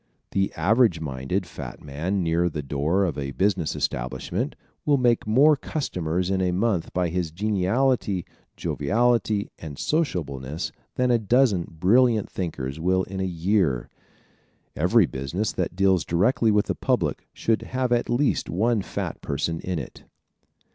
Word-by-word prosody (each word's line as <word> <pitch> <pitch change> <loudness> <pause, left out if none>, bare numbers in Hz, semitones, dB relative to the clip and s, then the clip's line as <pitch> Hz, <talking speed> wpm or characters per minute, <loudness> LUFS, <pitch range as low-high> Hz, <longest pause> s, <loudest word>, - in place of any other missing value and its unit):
One 95 0 +2
average 100 +1 +3
minded 75 +5 -2
fat 70 -7 -8
man 85 +7 -2
near 85 +1 +2
the 75 -2 -5
door 75 +8 +1
of 80 -6 -2
a 70 -1 -4
business 95 -3 0
establishment 65 - -2 0.3
will 145 -1 +3
make 120 -4 +2
more 140 +8 +6
customers 90 - -2
in 95 -1 +1
a 90 -1 +1
month 95 -2 0
by 90 -1 0
his 85 -1 -1
geniality, 100 +2 0 0.3
joviality 110 +4 +1
and 75 -3 -8
sociableness 75 - -2 0.2
than 125 -1 +2
a 120 - +4
dozen 110 -4 +2
brilliant 115 +3 +3
thinkers 75 -6 -4
will 95 +3 +2
in 95 +1 -6
a 95 - 0 0.2
year. 90 - +2 0.9
Every - - +4
business 75 +11 -3
that - - -2
deals 95 -3 +3
directly 100 - +2
with 105 -1 +3
the - - -1
public - - -1
should 115 -1 0
have 130 -1 -2
at 120 0 +1
least 125 +4 +1
one 110 +4 +1
fat - - -5
person 80 +4 -2
in 90 -2 -3
it. 70 - -7
95 Hz, 150 wpm, -25 LUFS, 80-115 Hz, 0.9 s, more